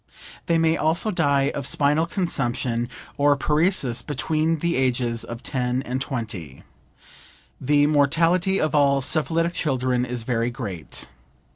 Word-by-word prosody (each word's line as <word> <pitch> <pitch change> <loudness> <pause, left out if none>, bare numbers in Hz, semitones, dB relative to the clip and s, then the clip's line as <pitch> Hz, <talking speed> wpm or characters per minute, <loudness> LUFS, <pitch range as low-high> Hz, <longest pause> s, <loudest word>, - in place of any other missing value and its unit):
They 170 -2 +3
may 165 0 +2
also 165 +7 +1
die 140 -5 +2
of 140 -1 -3
spinal 150 +3 +2
consumption 130 - -1 0.3
or 145 0 +3
paresis 150 -4 +1
between 155 +3 0
the 170 +2 -1
ages 120 -3 0
of 120 0 -8
10 125 -1 -1
and 130 +1 -3
20. 105 - -5 1.0
The 145 +2 +3
mortality 165 +6 +2
of 155 -2 0
all 140 -2 +3
syphilitic 160 +4 0
children 130 -6 0
is 125 -2 -3
very 115 0 0
great. 105 -9 -6
140 Hz, 130 wpm, -23 LUFS, 125-160 Hz, 1.0 s, They